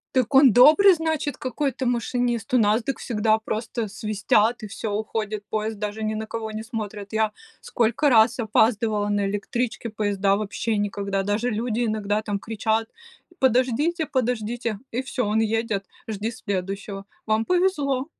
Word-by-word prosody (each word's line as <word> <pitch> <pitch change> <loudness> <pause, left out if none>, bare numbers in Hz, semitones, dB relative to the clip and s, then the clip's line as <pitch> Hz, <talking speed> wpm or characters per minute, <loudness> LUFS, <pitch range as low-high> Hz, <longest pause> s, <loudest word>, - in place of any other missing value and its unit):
Так 255 +1 +1
он 270 -3 +8
добрый, 310 +11 +7
значит, 315 -4 -2
какой-то 260 -1 -2
машинист! 240 -1 -1
У 250 - +5
нас, 215 +2 +3
дак 275 - -3
всегда 220 -1 +1
просто 220 +1 -3
свистят 215 +2 +1
и 215 - -6
всё, 205 +1 -5
уходит 215 -1 -3
поезд. 215 -1 -2
Даже 210 +1 -4
ни 215 0 -1
на 220 0 -4
кого 220 0 -5
не 215 +1 -5
смотрят. 215 -3 -6
Я 220 -1 +1 0.3
сколько 240 +5 +1
раз 225 0 +5
опаздывала 215 -1 +2
на 205 -1 +1
электричке, 225 +3 -3
поезда 200 -2 +1
вообще 215 +1 -2
никогда. 200 -1 -1
Даже 210 +5 0
люди 230 +1 -1
иногда 215 -1 -1
там 205 -2 -2
кричат: 220 +1 -1 0.5
"Подождите, 265 +6 +2
подождите!". 235 -4 -2
И 245 +3 -1
всё, 260 -3 -2
он 215 +2 +1
едет, 220 -2 -1 0.2
жди 220 +1 -3
следующего. 195 0 -4 0.2
Вам 220 0 +1
повезло. 290 -8 +1
220 Hz, 150 wpm, -24 LUFS, 210-245 Hz, 0.5 s, он